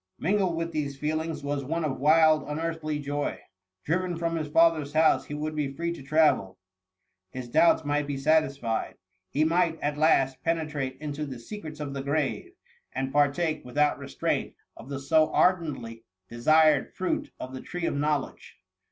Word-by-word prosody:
Mingled 190 0 +1
with 165 0 -2
these 140 -3 -3
feelings, 155 +1 -2
was 140 -1 -2
one 165 +4 -2
of 135 -4 -3
wild, 155 +2 +5
unearthly 155 0 -3
joy. 145 0 -3 0.4
Driven 175 +2 -1
from 165 0 -1
his 155 -2 -3
father^s 155 -2 +3
house, 160 0 +4
he 145 - -6
would 155 +1 -3
be 145 -3 -1
free 170 +4 -3
to 170 - -10
travel 135 -10 +2 0.4
— 95 0 -54
his 130 -2 -6
doubts 160 +4 +4
might 145 0 0
be 140 -1 -3
satisfied 140 -5 0 0.2
— 95 0 -41
^he 155 +2 +3
might, 165 0 +2
at 145 0 -2
last, 135 -4 +3
penetrate 150 -5 -2
into 150 0 -4
the 130 -2 -6
secrets 155 - -8
of 145 -2 -4
the 135 - -4
grave; 150 - -2 0.4
and 135 0 -2
partake, 145 +3 +1
without 145 +4 +1
restraint, - - -2 0.2
of 120 - -12
the 140 -1 -4
so 155 +3 +3
ardently 180 -3 +3
THE 130 -5 -6
MUMMY. - - -7
87 115 0 -14 0.3
desired 155 +5 +3
fruit 185 - -2
of 130 - -7
the 130 - -6
tree 175 -1 -5
of - - 0
knowledge. 145 -1 -2
150 Hz, 180 wpm, -27 LUFS, 140-160 Hz, 0.4 s, wild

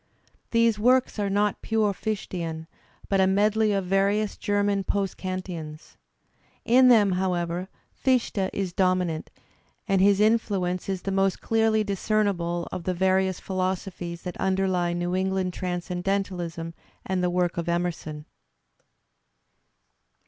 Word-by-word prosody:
These 230 -2 +3
works 250 +1 +3
are 200 -1 0
not 205 +1 +1
pure 215 -2 +1
Fichtean, 175 -6 -4 0.4
but 195 -1 +2
a 190 - +4
medley 210 +2 +2
of 195 -2 0
various 200 +3 +1
German 205 -1 0
post 195 0 -1
Kantians. 180 -5 -6 0.7
In 255 +2 +6
them, 215 -5 +6
however, 180 -1 -1 0.3
Fichte 240 -7 +1
is 190 -3 -3
dominant, 180 -4 0 0.6
and 195 -2 +2
his 200 0 +4
influence 200 -5 +1
is 190 -2 -3
the 195 - -2
most 195 0 +1
clearly 220 -1 +2
discernible 195 -4 -1
of 185 -2 -5
the 185 - -1
various 190 0 +1
philosophies 185 -2 -3
that 180 - -6
underlie 185 -2 +1
New 175 +1 -1
England 190 -1 0
Transcendentalism 180 -2 -3 0.3
and 185 -1 -1
the 180 - +2
work 175 -1 0
of 170 0 -2
Emerson. 170 -3 -3
190 Hz, 125 wpm, -26 LUFS, 180-205 Hz, 0.7 s, In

